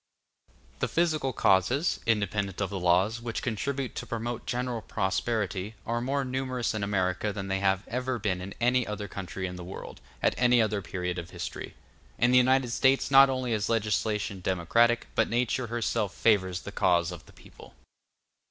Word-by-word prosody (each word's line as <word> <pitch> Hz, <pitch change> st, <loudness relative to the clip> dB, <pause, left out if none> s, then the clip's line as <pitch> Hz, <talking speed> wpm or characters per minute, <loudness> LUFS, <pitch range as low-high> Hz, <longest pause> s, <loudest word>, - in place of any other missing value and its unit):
The -, -, 0 dB
physical 155 Hz, -5 st, +1 dB
causes, 120 Hz, -, +2 dB
independent 100 Hz, -3 st, 0 dB
of 100 Hz, -2 st, -1 dB
the 100 Hz, -, -3 dB
laws, 95 Hz, +6 st, +2 dB
which 115 Hz, -1 st, -4 dB
contribute 130 Hz, +3 st, -2 dB
to -, -, -6 dB
promote 115 Hz, 0 st, -4 dB
general 125 Hz, -2 st, -2 dB
prosperity, 100 Hz, 0 st, -2 dB
are 120 Hz, +1 st, -1 dB
more 135 Hz, +2 st, -1 dB
numerous 130 Hz, -2 st, -2 dB
in 110 Hz, -1 st, -3 dB
America 95 Hz, 0 st, 0 dB
than 100 Hz, -1 st, -5 dB
they 95 Hz, 0 st, 0 dB
have 95 Hz, 0 st, +1 dB
ever 125 Hz, +1 st, -2 dB
been 100 Hz, -5 st, -1 dB
in 95 Hz, +2 st, -7 dB
any 125 Hz, +1 st, +2 dB
other 105 Hz, -1 st, -4 dB
country 95 Hz, -1 st, -5 dB
in 90 Hz, -1 st, -5 dB
the 90 Hz, -, -7 dB
world, 90 Hz, +2 st, -9 dB, 0.2 s
at -, -, +3 dB
any 125 Hz, -1 st, +5 dB
other 105 Hz, -2 st, +1 dB
period 90 Hz, -1 st, -3 dB
of 85 Hz, -, -8 dB
history. -, -, -6 dB, 0.4 s
In 120 Hz, +1 st, +3 dB
the 125 Hz, -, +6 dB
United 130 Hz, -1 st, +3 dB
States 135 Hz, +3 st, +2 dB
not 135 Hz, 0 st, +8 dB
only 130 Hz, -2 st, -1 dB
is 105 Hz, -1 st, -1 dB
legislation 105 Hz, -2 st, 0 dB
democratic, 115 Hz, +7 st, +2 dB
but 115 Hz, -, +2 dB
nature 120 Hz, +1 st, 0 dB
herself 115 Hz, -3 st, -1 dB
favors 95 Hz, -5 st, +2 dB
the 100 Hz, -, -8 dB
cause 90 Hz, -3 st, +2 dB
of 90 Hz, -, -10 dB
the -, -, -17 dB
people. -, -, -16 dB
110 Hz, 175 wpm, -28 LUFS, 95-125 Hz, 0.4 s, not